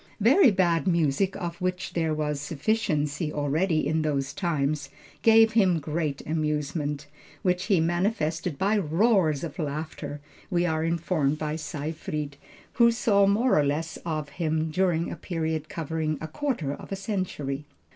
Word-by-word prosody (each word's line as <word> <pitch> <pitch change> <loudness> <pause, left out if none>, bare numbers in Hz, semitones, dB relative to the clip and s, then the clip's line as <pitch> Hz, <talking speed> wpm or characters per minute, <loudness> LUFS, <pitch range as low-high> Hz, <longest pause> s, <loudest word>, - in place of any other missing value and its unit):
Very 260 - +6
bad 175 -5 +2
music 170 +2 +2
of 175 -3 -5
which 185 0 -2
there 165 -2 0
was 150 -1 -1
a - - -6
sufficiency 150 -2 -1
already 155 +3 +1
in 160 +2 +1
those 140 -2 -1
times, 155 -4 -1 0.3
gave 225 0 +6
him 190 -6 +4
great 150 -1 -2
amusement, 150 -1 -2 0.4
which 180 -1 +1
he 195 -6 +3
manifested 170 -2 0
by 205 +5 +2
roars 175 - +2
of 165 -1 -6
laughter, 150 -1 -4 0.3
we 175 -1 +1
are 160 -2 0
informed 165 -3 0
by 155 0 -2
Seyfried, 155 -1 -4 0.4
who 235 - +8
saw 205 -4 +3
more 215 -1 +3
or - - +4
less 150 +3 -2
of 155 -3 -3
him 160 +1 -1
during 170 -1 +1
a - - -4
period 160 -3 -3
covering 160 -1 -2
a 160 - -5
quarter 165 - -2
of - - -10
a - - 0
century. 185 -8 -3
160 Hz, 150 wpm, -26 LUFS, 150-185 Hz, 0.4 s, who